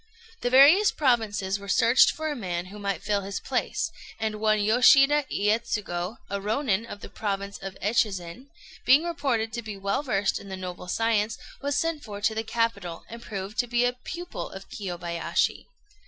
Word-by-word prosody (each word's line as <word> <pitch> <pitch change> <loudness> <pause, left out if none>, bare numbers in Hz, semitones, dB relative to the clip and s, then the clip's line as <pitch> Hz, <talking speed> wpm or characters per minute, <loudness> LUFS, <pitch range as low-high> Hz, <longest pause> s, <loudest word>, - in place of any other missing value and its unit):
The 245 - -1
various 290 +11 +7
provinces 220 -8 +1
were 200 - -10
searched 235 +2 +5
for 315 0 -3
a - - -3
man 180 -7 -3
who 200 +3 -10
might 200 -4 -3
fill 205 -1 0
his 200 +1 -4
place, - - -2 0.3
and 215 -1 -3
one 215 -1 +3
Yoshida 275 +7 +5
Iyétsugu, 210 -3 -1
a 200 - -3
Rônin 220 +1 0
of 205 - -9
the - - -8
province 200 -1 -4
of 195 0 -7
Echizen, 205 +1 -1 0.4
being 275 +5 +6
reported 270 -10 -1
to 235 - -3
be 215 -3 -7
well 200 +6 -1
versed 205 -8 0
in 200 - -11
the 190 - -5
noble 180 -1 -7
science, 220 +2 +1 0.2
was 285 0 -1
sent 330 -2 -1
for 205 -2 -7
to 220 +2 +1
the 220 0 -2
capital, 220 -7 -2
and 230 +1 -9
proved 200 -1 -6
to 245 - +2
be 240 +1 +2
a 245 - +1
pupil 345 +8 -7
of 195 0 -10
Kiyobayashi. 175 -4 -2
215 Hz, 180 wpm, -26 LUFS, 195-245 Hz, 0.4 s, various